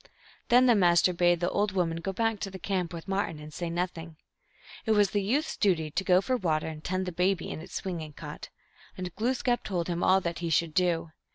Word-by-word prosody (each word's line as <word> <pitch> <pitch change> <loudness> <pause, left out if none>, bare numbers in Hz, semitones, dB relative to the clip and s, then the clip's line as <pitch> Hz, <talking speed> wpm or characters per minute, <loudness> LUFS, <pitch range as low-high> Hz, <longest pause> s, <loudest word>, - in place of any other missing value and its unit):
Then 250 +1 +6
the 245 - +6
Master 180 -3 +4
bade 175 0 +3
the 175 - +1
old 205 -1 0
woman 170 -3 0
go 180 +3 -3
back 225 +2 0
to 195 - -3
the 190 - -8
camp 185 -2 -2
with 170 +1 -8
Martin, 195 -4 -1
and 150 0 -10
say 175 +1 -4
nothing. 170 -1 -4 0.7
It 220 - +4
was 205 -3 +3
the 205 - +1
youth 260 +11 +1
s - - -5
duty 165 -7 +1
to 185 +5 -1
go 185 -1 +4
for 255 +5 0
water 160 -7 0
and 155 -1 -7
tend 185 +1 -1
the 180 - -3
baby 180 +1 0
in - - -5
its - - -10
swinging 165 -5 -4
cot. - - -8 0.5
And 180 -2 -5
Glooskap 245 +1 0
told 175 -4 -2
him 175 0 -2
all 190 +1 +5
that 170 -2 -4
he 170 -1 -2
should 165 0 +1
do. 170 -2 +1
180 Hz, 235 wpm, -28 LUFS, 170-195 Hz, 0.7 s, Then